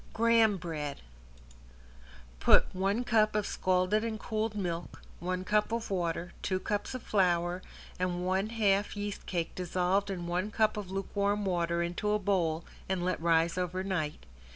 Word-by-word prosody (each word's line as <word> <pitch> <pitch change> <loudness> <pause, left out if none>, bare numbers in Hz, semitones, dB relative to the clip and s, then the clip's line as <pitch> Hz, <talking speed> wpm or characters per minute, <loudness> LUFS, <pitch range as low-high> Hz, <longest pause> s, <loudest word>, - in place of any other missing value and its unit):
~GRAHAM 225 -2 +4
BREAD~ 155 -5 -4 1.4
Put - - +5
one 195 +5 0
cup 215 -3 +3
of 210 -2 +1
scalded 185 +3 +1
and 220 -1 -3
cooled 220 +1 -2
milk, 175 -4 -3 0.2
one 185 +1 -2
cup 210 +2 +1
of 230 -2 -2
water, 175 -1 -1
two 185 -1 0
cups 205 +5 -2
of 255 - -6
flour 180 -2 +1 0.4
and 180 -1 -1
one 190 +3 +1
half 205 -2 +1
yeast 205 0 -4
cake 170 -3 -2
dissolved 185 +2 0
in 180 -3 -3
one 180 +4 -1
cup 215 0 +2
of 205 -3 -5
lukewarm 200 +1 -1
water 170 -2 +1
into 175 +5 -2
a - - +3
bowl 175 -5 0 0.2
and 185 -2 0
let 180 -2 -1
rise 165 +1 +3
over 180 +1 -2
night. 155 - -2
185 Hz, 155 wpm, -31 LUFS, 175-210 Hz, 1.4 s, Put